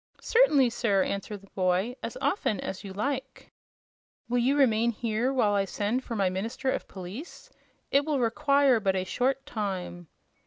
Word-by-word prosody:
"Certainly, 295 - +4
sir," 205 -5 +2
answered 200 0 -4
the 200 - -18
boy; 185 +5 0
"as - - -5
often 215 - 0
as 190 +2 -5
you 195 - -7
like." 265 +6 -4 0.8
"Will 245 +1 +1
you 265 +4 +2
remain 235 -4 +3
here 235 +2 -1
while 230 -6 +2
I 200 -1 +2
send 210 +6 -2
for 235 - -5
my 195 -3 +2
minister 225 +8 -2
of - - -3
police? 195 - -9 0.4
It 280 +1 +4
will 295 -2 0
require 260 +2 +3
but 195 -2 +1
a 185 - 0
short 260 +7 -1
time." 185 -5 -4
225 Hz, 165 wpm, -28 LUFS, 195-265 Hz, 0.8 s, Certainly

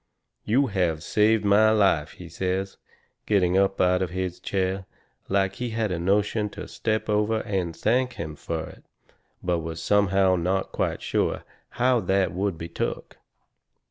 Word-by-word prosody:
"You 130 +6 +3
have 90 - -1
saved 105 +2 +2
my 105 +2 +5
life," 100 -8 +2
he 90 - -11
says, 95 +3 -3 0.5
getting 95 -4 +2
up 95 0 +2
out 90 0 +3
of 95 - -1
his 90 0 -4
chair, 95 0 -2 0.4
like 95 0 +1
he 125 -1 -3
had 110 -2 -1
a 85 - -2
notion 105 +4 +1
to - - -6
step 110 -1 -2
over 105 +1 +1
and 95 -6 -2
thank 125 +6 +1
him 80 -8 -6
fur 80 +1 -4
it, - - -13 0.6
but 90 -1 +1
was 80 0 -5
somehow 95 -2 +3
not 95 +3 -1
quite - - -2
sure - - 0 0.3
how 125 0 +3
that 95 -3 +1
would 95 -1 -1
be 85 - -6
took. - - -4
95 Hz, 160 wpm, -25 LUFS, 90-105 Hz, 0.6 s, my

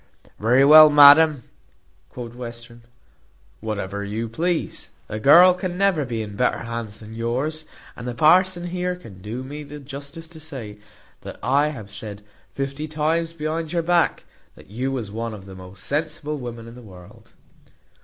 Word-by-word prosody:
"Very 125 +5 +4
well, 155 +1 +9
madam," 145 -1 +7 0.7
quoth 120 +3 -8
Western, 120 -1 -9 0.8
"whatever 100 -2 -4
you 110 +3 -4
please. 165 +9 -3 0.2
The 110 - -5
girl 170 +10 +7
can 180 -1 -5
never 190 -7 +2
be 115 -3 -3
in 105 -1 -9
better 125 +2 0
hands 115 -3 -6
than 110 +1 -11
yours; 130 +8 -3 0.3
and 120 - -8
the 120 - -4
parson 175 +5 +3
here 180 0 -2
can 105 - -14
do 115 +6 -6
me 145 +3 -8
the 150 0 -10
justice 140 +4 -9
to 160 -1 -13
say, 130 -10 -9 0.4
that - - -9
I 140 +3 +2
have 110 -10 -8
said 105 -1 -8 0.3
fifty 140 +2 -4
times 160 +2 -1
behind 160 0 -4
your 170 -1 0
back, 175 +1 +1 0.3
that - - -17
you 130 +5 -3
was 120 -7 -4
one 115 +1 -5
of 95 -2 -12
the 95 - -11
most 95 0 -12
sensible 150 0 -3
women 120 -2 -8
in 115 - -11
the 125 - -12
world." 90 -6 -16
135 Hz, 165 wpm, -22 LUFS, 115-155 Hz, 0.8 s, well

